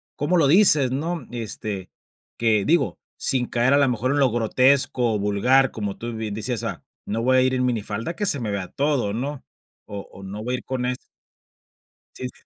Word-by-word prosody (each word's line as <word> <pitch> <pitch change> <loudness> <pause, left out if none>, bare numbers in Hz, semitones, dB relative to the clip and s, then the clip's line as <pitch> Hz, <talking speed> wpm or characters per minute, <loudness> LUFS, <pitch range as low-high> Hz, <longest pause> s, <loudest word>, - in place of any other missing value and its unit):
cómo 165 +5 +1
lo 145 -4 +4
dices, 150 -6 +6
¿no? 155 +1 -3
Este, 110 -4 -5 0.5
que 110 -3 +2
digo, 170 +3 +1 0.2
sin 125 -3 0
caer 125 +3 +2
a - - +5
lo 140 -2 +3
mejor 125 +2 -1
en 145 - +1
lo 135 -3 +3
grotesco, 125 +1 +2
o - - -1
vulgar, 115 +7 +3
como 105 -3 -4
tú 120 0 -5
bien 110 -2 -4
decías, 110 +2 -2
ah, - - -5 0.2
no 115 +3 -2
voy 130 +1 +4
a - - +5
ir 130 0 +2
en 125 0 +1
minifalda 115 +4 -2
que 205 - -2
se 145 -8 +1
me 110 -4 -3
vea 100 -2 -3
todo, 140 -8 0
¿no? 135 +5 -4 0.4
O 100 -1 -8
o 95 - -12
no 100 +3 -7
voy 125 +2 -1
a - - -2
ir - - -16
con 130 -1 -3
es 125 0 -1 1.2
Sí. 125 -1 -5
125 Hz, 205 wpm, -23 LUFS, 110-135 Hz, 1.2 s, dices